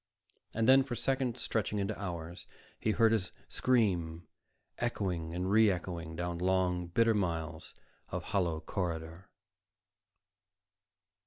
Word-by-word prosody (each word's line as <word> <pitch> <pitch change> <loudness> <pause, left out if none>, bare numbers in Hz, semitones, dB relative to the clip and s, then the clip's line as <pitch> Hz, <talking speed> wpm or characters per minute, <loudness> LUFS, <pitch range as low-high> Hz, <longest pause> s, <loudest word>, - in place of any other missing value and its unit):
And 115 +1 +2
then, 135 +1 +8
for 130 -2 -3
seconds 130 0 -1
stretching 105 -1 -1
into 100 +1 -1
hours, 85 -1 -6 0.3
he - - 0
heard 110 +1 +4
his 105 -5 +1 0.2
scream 90 -9 +1 0.5
echoing 90 -9 -1
and 90 +2 -1
re 110 0 +6
echoing 85 -3 -3
down 85 0 -3
long, 90 -1 +1
bitter 115 +6 +3
miles 85 -5 -2 0.3
of - - -3
hollow 85 -5 +1
corridor. 85 0 -4
95 Hz, 115 wpm, -32 LUFS, 85-110 Hz, 0.5 s, then